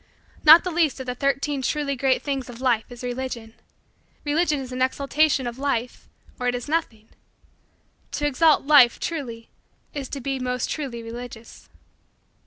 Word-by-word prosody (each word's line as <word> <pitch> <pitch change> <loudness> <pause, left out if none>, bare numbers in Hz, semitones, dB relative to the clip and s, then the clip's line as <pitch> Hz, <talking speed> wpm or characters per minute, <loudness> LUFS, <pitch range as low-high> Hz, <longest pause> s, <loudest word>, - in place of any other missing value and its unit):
Not 320 +2 +9
the 365 - -3
least 320 -5 +1
of 260 - -5
the 250 - -3
Thirteen 275 +2 -1
Truly 280 +2 -1
Great 265 0 +1
Things 270 -3 -3
of 240 -1 -10
Life 245 -4 +1
is 245 0 -10
Religion. 245 -2 -5 0.7
Religion 300 0 +1
is 260 -1 -7
an 255 0 -4
exaltation 280 +1 +1
of 240 +1 -5
Life 250 -4 -3 0.3
or 250 - -1
it 245 - +1
is 245 - -5
nothing. 235 -9 -2 1.1
To 295 - -1
exalt 300 +2 +4
Life 275 -5 +6
truly 240 -9 -5 0.4
is 275 -3 -5
to 280 - -5
be 270 +1 -3
most 250 -1 -2
truly 255 -6 -4
religious. 230 0 -10
260 Hz, 160 wpm, -24 LUFS, 245-290 Hz, 1.1 s, Not